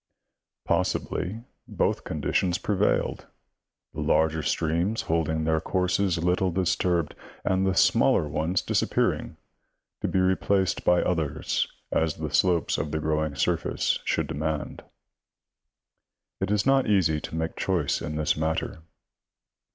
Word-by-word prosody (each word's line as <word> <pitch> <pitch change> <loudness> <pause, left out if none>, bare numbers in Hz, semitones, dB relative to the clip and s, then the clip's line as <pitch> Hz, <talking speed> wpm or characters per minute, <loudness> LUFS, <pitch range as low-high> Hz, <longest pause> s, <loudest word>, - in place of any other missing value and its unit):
Possi 90 +2 +2
bly 110 +6 -5 0.2
both - - -1
conditions 85 +3 0
prevailed; 100 +1 0 0.7
the - - -5
larger 80 0 +2
streams 85 +7 0
holding 80 -1 0
their 80 0 +1
courses 90 +1 0
little 90 +2 +1
disturbed, 90 -2 0 0.3
and 95 +1 +2
the 95 - +1
smaller 75 - +4
ones 80 +5 -1
disappearing, - - 0 0.6
to - - 0
be - - -1
replaced 95 +1 +1
by 90 0 +3
others 80 -4 -1 0.2
as 80 -2 +1
the - - -5
slopes 90 -3 +2
of 80 - -2
the 80 - -2
growing 80 -1 -1
surface 65 - 0
should - - 0
demand. 75 0 -3 1.6
It - - -1
is 105 0 +1
not 135 0 +3
easy 85 -7 +2
to - - -6
make 80 0 -2
choice 85 -7 0
in 75 - -4
this 75 0 +1
matter. 80 0 -2
85 Hz, 130 wpm, -26 LUFS, 80-95 Hz, 1.6 s, smaller